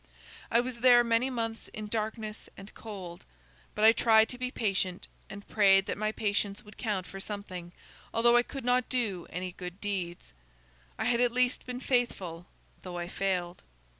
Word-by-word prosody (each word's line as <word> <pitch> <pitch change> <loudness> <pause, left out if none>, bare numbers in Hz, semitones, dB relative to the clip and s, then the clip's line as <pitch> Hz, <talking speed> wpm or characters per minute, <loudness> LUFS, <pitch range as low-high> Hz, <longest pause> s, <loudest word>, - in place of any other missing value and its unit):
"I 235 - +4
was 245 -1 -5
there 245 0 +7
many 235 +2 +2
months 225 -3 -3
in 215 - -5
darkness 215 0 -4
and 195 +1 -11
cold. 190 -6 -8 0.5
But 210 - +3
I 220 - +10
tried 220 -1 +5
to 250 - -5
be 250 0 -1
patient, 190 -6 -1 0.2
and 200 +1 -9
prayed 195 -2 +5
that - - -2
my 215 +1 -1
patience 205 -1 -1
would 210 0 -15
count 205 -5 -1
for 195 - -9
something, 190 -4 -6 0.4
although 235 +1 +4
I 240 - +7
could 265 +1 -7
not 250 0 +2
do 215 -9 -1
any 180 +1 -4
good 180 +1 -8
deeds. 185 - -4 0.6
I - - -2
had 235 0 +2
at 245 -1 +3
least 250 +1 +1
been 250 0 -5
faithful 190 -10 -1 0.3
though 180 -1 -7
I 175 0 -3
failed. 180 -2 -2
215 Hz, 175 wpm, -30 LUFS, 190-235 Hz, 0.6 s, I